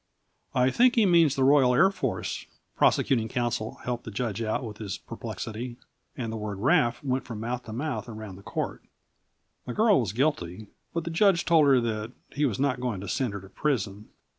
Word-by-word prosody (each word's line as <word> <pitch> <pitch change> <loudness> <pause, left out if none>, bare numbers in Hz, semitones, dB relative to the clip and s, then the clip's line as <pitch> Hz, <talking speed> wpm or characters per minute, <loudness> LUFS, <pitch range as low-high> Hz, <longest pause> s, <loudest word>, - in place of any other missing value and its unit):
"I 130 0 +4
think 245 - +4
he 225 -3 +5
means 165 -6 +5
the 135 - +1
Royal 130 -2 +5
Air 190 +8 +5
Force," 195 - -3 0.3
prosecuting 115 -5 +3
counsel 120 -2 -2
helped 120 -1 -3
the 115 - -7
judge 110 0 -3
out 110 +2 -1
of 110 -3 -7
his 100 -4 -4
perplexity. 120 +5 -6 0.4
And 115 -3 -3
the - - -3
word 105 -2 -4
"Wraf" 120 +2 +2
went 130 -1 0
from 115 -3 -7
mouth 120 +2 -3
to 110 - -8
mouth 125 -2 -3
round 110 -4 -8
the 95 - -12
court. - - -4 0.8
The 125 - -4
girl 215 -2 +5
was 110 -8 -1
guilty, 110 - -1 0.3
but 170 - -2
the 170 - -4
judge 180 0 +3
told 160 -4 +5
her 135 -2 +6
that 110 0 -3 0.2
he 145 +1 0
was 115 -3 -3
not 130 -3 +1
going 120 -6 -2
to 100 - -7
send 125 +2 -1
her 100 - -5
to 95 - -13
prison. 105 -6 -2
120 Hz, 200 wpm, -27 LUFS, 110-140 Hz, 0.8 s, her